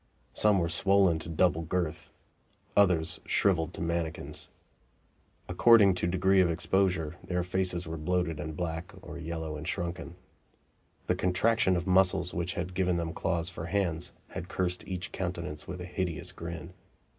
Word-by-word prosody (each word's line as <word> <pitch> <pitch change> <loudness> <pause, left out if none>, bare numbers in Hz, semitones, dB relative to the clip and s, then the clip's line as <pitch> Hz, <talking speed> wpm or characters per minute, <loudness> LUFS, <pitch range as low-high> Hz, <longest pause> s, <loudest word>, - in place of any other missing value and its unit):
Some 105 -2 +4
were 85 -2 +1
swollen 95 -1 +3
to 80 - -7
double 85 0 +2
girth; 85 -1 -2 0.7
others 85 -5 +3
shriveled 85 -5 +2
to - - -7
manikins. 85 -1 -3 1.0
According 100 +1 +6
to 90 -1 -1
degree 95 +2 +3
of 90 - +3
exposure, 85 -1 0
their 90 -1 -1
faces 90 -1 -1
were 80 0 -5
bloated 85 0 -1
and 75 +1 -5
black 85 +1 -3
or 85 - -8
yellow 80 -2 -4
and 75 +1 -7
shrunken. 85 -1 -3 0.9
The - - +2
contraction 95 +2 +2
of 85 0 -1
muscles 95 -1 +3
which 85 0 -2
had 90 +1 -3
given 90 -1 +1
them 85 -1 -2
claws 85 0 -1
for 80 -1 -6
hands 90 -3 0 0.2
had 90 0 -6
cursed 90 -1 -2
each 90 -1 -4
countenance 85 -5 -4
with 90 0 -6
a 90 - -5
hideous 90 -1 -3
grin. 85 +1 -7
90 Hz, 155 wpm, -30 LUFS, 85-95 Hz, 1.0 s, According